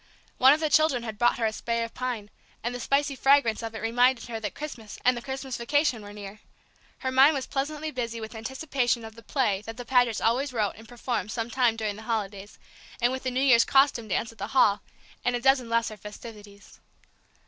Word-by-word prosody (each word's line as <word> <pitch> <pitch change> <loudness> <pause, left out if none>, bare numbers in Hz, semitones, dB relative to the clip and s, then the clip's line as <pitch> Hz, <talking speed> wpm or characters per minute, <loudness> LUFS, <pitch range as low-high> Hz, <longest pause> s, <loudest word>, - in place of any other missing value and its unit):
One 260 +1 +8
of 300 - +3
the 315 - +1
children 300 -6 +3
had 220 -2 -6
brought 240 0 +3
her 230 - 0
a 220 - 0
spray 235 +1 -2
of 230 - -7
pine, 240 -5 -4 0.3
and 240 +1 -2
the 245 - -5
spicy 280 +3 0
fragrance 270 -5 +3
of 225 -1 -6
it 220 - -6
reminded 245 +2 +2
her 225 -1 -4
that 210 -2 -5
Christmas 240 -8 -8
and 250 0 +5
the 240 - -5
Christmas 265 0 -5
vacation 285 -1 +1
were 205 0 -10
near; 205 0 -9 0.6
her 260 - -1
mind 270 +4 +6
was 265 -2 -2
pleasantly 300 +2 -3
busy 235 -4 -4
with 220 +1 -7
anticipation 245 0 -1
of 220 - -10
the 230 - -14
play 225 -5 0
that 225 0 -7
the 245 - -7
Pagets 245 -3 +2
always 255 +4 0
wrote 215 -4 0
and 225 +1 -14
performed 235 -4 -3
some 230 0 -3
time 240 -1 +2
during 215 -2 -3
the - - -9
holidays, 205 -2 -3 0.4
and 240 0 +2
with 260 0 -4
the 260 - -2
New 255 +1 -1
Year's 240 -4 +6
costume 270 -4 +3
dance 220 +3 -1
at 225 - -21
the 200 - -3
Hall, 205 -5 +5 0.4
and 245 - +1
a - - -1
dozen 260 -1 +3
lesser 230 -2 0
festivities. 210 -1 -12
235 Hz, 220 wpm, -27 LUFS, 220-265 Hz, 0.6 s, One